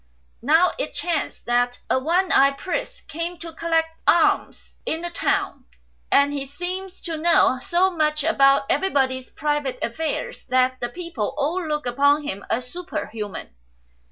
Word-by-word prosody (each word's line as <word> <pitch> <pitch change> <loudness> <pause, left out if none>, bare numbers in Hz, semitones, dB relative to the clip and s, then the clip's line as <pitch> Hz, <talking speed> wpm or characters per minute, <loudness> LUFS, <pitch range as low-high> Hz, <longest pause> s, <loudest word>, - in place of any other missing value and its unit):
Now 320 +8 +4
it - - -3
chanced 335 -4 -2
that 245 +1 +1
a - - +2
one 345 +7 +1
eyed 275 0 +4
priest 380 - -4
came 335 +2 -4
to 330 0 -8
collect 325 0 0 0.2
alms 340 - +2
in 320 - -2
the 345 0 -5
town, 390 -7 -1 0.5
and 285 +1 +4
he 280 -1 -2
seemed 360 +7 -5
to 330 -2 -3
know 310 -5 +3
so 375 0 +2
much 305 -3 0
about 275 -3 +4
everybody's 265 -8 0
private 295 -3 -2
affairs 310 +7 -3
that 255 0 +2
the 240 - -2
people 305 -6 -4
all 315 +6 0
looked 300 -2 -2
upon 285 +4 +3
him 200 -9 -5
as 250 +2 -1
superhuman. 225 - -6
300 Hz, 150 wpm, -23 LUFS, 260-345 Hz, 0.5 s, Now